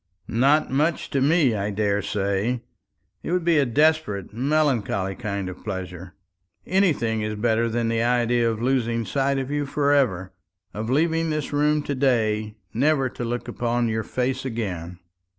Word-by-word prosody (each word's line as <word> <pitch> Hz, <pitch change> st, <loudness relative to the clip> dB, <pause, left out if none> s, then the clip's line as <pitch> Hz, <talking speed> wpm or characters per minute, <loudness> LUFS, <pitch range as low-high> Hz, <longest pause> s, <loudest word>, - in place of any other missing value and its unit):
"Not 140 Hz, +6 st, +2 dB
much 155 Hz, +5 st, 0 dB
to 135 Hz, -, +1 dB
me, 145 Hz, -3 st, +3 dB
I 100 Hz, -1 st, -1 dB
daresay. 100 Hz, +2 st, -1 dB, 0.6 s
It -, -, -5 dB
would 180 Hz, -2 st, 0 dB
be 165 Hz, -3 st, +4 dB
a 140 Hz, -, +2 dB
desperate, 145 Hz, -, +1 dB
melancholy 125 Hz, -7 st, 0 dB
kind 100 Hz, -3 st, -4 dB
of 90 Hz, 0 st, -8 dB
pleasure. 95 Hz, -3 st, -6 dB, 0.5 s
Anything 145 Hz, -, +1 dB
is 105 Hz, 0 st, -2 dB
better 115 Hz, +1 st, +1 dB
than 115 Hz, 0 st, -1 dB
the 115 Hz, 0 st, 0 dB
idea 120 Hz, 0 st, +2 dB
of 115 Hz, 0 st, -3 dB
losing 120 Hz, -3 st, 0 dB
sight 140 Hz, +2 st, 0 dB
of 135 Hz, +1 st, -3 dB
you 145 Hz, -1 st, -1 dB
for 145 Hz, 0 st, +1 dB
ever 95 Hz, -10 st, +1 dB, 0.4 s
of 110 Hz, +2 st, -4 dB
leaving 165 Hz, +4 st, +1 dB
this 155 Hz, -2 st, -3 dB
room 150 Hz, +1 st, +2 dB
to 145 Hz, -, -2 dB
day 110 Hz, -5 st, +1 dB, 0.2 s
never 135 Hz, +2 st, +2 dB
to 120 Hz, -, -6 dB
look 120 Hz, +1 st, -3 dB
upon 120 Hz, 0 st, -1 dB
your 110 Hz, 0 st, -1 dB
face 130 Hz, +3 st, -2 dB
again." 95 Hz, -9 st, -4 dB
120 Hz, 160 wpm, -24 LUFS, 105-140 Hz, 0.6 s, be